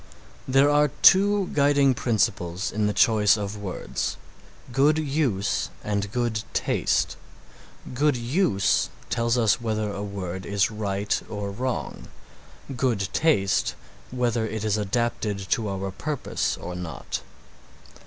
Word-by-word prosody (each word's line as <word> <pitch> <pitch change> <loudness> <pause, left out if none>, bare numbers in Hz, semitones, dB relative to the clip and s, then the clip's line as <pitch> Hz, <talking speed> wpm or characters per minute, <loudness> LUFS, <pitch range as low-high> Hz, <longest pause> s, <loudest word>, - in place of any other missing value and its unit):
There 135 +2 +4
are 150 0 +4 0.2
two 200 0 +5
guiding 140 -2 +4
principles 105 -6 -1
in 105 0 0
the - - +1
choice 105 0 +4
of 100 0 -4
words, 105 -3 -4 0.6
good 145 +4 +4
use 135 -10 0
and 100 -1 -2
good 120 -2 -1
taste. - - 0 0.8
Good 145 +1 +2
use 120 - +1 0.2
tells 115 +1 +1
us 115 -1 +2
whether 110 -2 -1
a 100 - -5
word 95 -2 -5
is 100 +2 +1
right 105 -1 -1
or 105 -2 -4
wrong; 125 +5 -4 0.7
good 115 -7 0
taste, 145 -12 +2 0.3
whether 120 -2 0
it 110 -1 -3
is 105 -1 +1
adapted 110 0 -1
to 110 -5 +1
our 95 0 -3
purpose 145 +8 -2
or 90 - -6
not. 90 -2 -5
110 Hz, 125 wpm, -25 LUFS, 100-130 Hz, 0.8 s, two